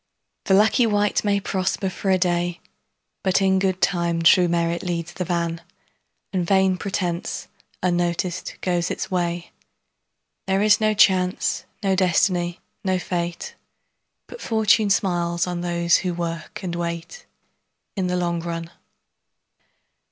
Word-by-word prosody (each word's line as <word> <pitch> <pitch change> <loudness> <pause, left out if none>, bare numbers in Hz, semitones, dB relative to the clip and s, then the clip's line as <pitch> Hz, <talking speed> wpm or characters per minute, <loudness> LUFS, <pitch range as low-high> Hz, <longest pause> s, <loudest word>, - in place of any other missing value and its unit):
The 190 - +4
lucky 220 +4 +4
wight 205 -1 +1
may 200 -1 +2
prosper 190 +1 -1
for 190 +1 -3
a 190 - +4
day, 175 -1 0 0.6
But 190 -1 +2
in 190 -1 +3
good 185 -1 0
time 170 -2 +1
true 175 +2 +6
merit 170 0 0
leads 175 -1 -3
the 180 - -3
van 170 -1 -2 0.7
And 185 -2 +1
vain 190 +1 +3
pretence, 180 -3 -3 0.4
unnoticed, 175 0 -1
goes 175 -2 0
its - - -4
way. 175 -1 -2 1.0
There 195 +1 +2
is 215 0 +4
no 215 0 +2
Chance, 185 -2 +2 0.2
no 195 -1 +2
Destiny, 175 -1 +1 0.2
no 185 -1 +1
Fate, 175 -1 -4 0.7
But - - -11
Fortune 215 -2 +2
smiles 175 -4 +1
on 175 -1 -3
those 170 -1 +2
who 180 -2 -2
work 165 -1 -5
and 180 -2 -3
wait, 170 - -5 0.7
In 190 -3 -1
the 180 0 0
long 170 -1 -1
run. 165 0 -5
180 Hz, 135 wpm, -23 LUFS, 170-190 Hz, 1.0 s, true